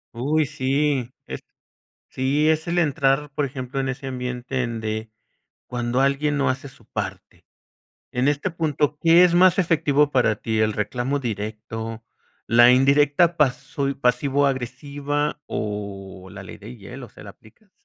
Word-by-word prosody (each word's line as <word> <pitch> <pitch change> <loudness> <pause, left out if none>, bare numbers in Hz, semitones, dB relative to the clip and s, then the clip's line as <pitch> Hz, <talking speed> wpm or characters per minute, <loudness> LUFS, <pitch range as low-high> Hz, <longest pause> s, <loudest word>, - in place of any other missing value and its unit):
Uy, 150 +6 +1
sí, 140 -2 0
es - - -6 0.7
Sí, 140 +4 +1
es 160 +2 +1
el 170 +1 -1
entrar, 145 -2 +1
por 145 0 -1
ejemplo, 130 0 -5
en 135 0 -1
ese 135 +1 -5
ambiente 125 0 -3
donde 110 -2 -4 0.6
cuando 120 +1 -2
alguien 145 +2 +1
no 140 -1 +1
hace 130 +2 -3
su 135 - -18
parte. - - -7 0.7
En 125 +2 0
este 145 +5 0
punto, 150 -3 0
¿qué 165 +2 +6
es 180 -1 +4
más 180 +1 +5
efectivo 150 -5 +2
para 125 -5 +2
ti? 110 +1 -2
¿El 110 0 +2
reclamo 125 +7 -2
directo, 110 0 -5 0.4
la 120 +1 +6
indirecta 145 +6 +4
paso 140 0 0
pasivo-agresiva, 140 +3 -1
o 100 -3 -5
la 100 0 -9
ley 95 - -10
de 110 +5 -10
hielo? 120 +5 -10
¿Se - - -14
la 100 - -9
aplicas? 185 - -23
135 Hz, 145 wpm, -23 LUFS, 120-145 Hz, 0.7 s, qué